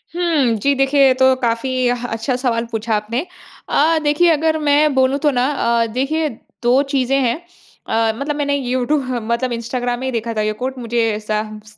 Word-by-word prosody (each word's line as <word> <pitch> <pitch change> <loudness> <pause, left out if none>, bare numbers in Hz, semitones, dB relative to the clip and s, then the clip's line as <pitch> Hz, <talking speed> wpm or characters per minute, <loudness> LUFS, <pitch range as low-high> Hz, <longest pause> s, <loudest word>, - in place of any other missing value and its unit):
हुँ, 320 -9 +2
जी 280 +7 +1
देखिए 270 +1 +2
ये 260 - +5
तो 260 0 +4
काफ़ी 235 0 -1 0.2
ह 245 0 -1
अच्छा 225 +3 -2
सवाल 235 -2 -1
पूछा 225 0 -1
आपने। 230 +8 -2 0.4
अ, 320 +3 +3
देखिए 295 +4 +3
अगर 315 +1 +1
मैं 295 0 +3
बोलूँ 265 +1 +3
तो 295 -1 +2
ना 250 0 +1
अ, 235 -4 +1
देखिए 305 +5 0 0.3
2 250 +3 +4
चीज़ें 270 0 +1
हैं 235 -2 +1 0.5
अ, 225 0 +1
मतलब 290 +1 -2
मैंने 285 -1 0
यूट्यू 255 +2 0
मतलब 245 -1 -2
इंस्टाग्राम 240 +1 -3
में 260 - -3
ही - - -1
देखा 230 0 -3
था 215 - -1
ये 215 0 0
कोट 260 +1 -3
मुझे 235 -1 -1
ऐसा 215 0 -2 0.3
स 215 - -16
255 Hz, 195 wpm, -18 LUFS, 235-280 Hz, 0.5 s, ये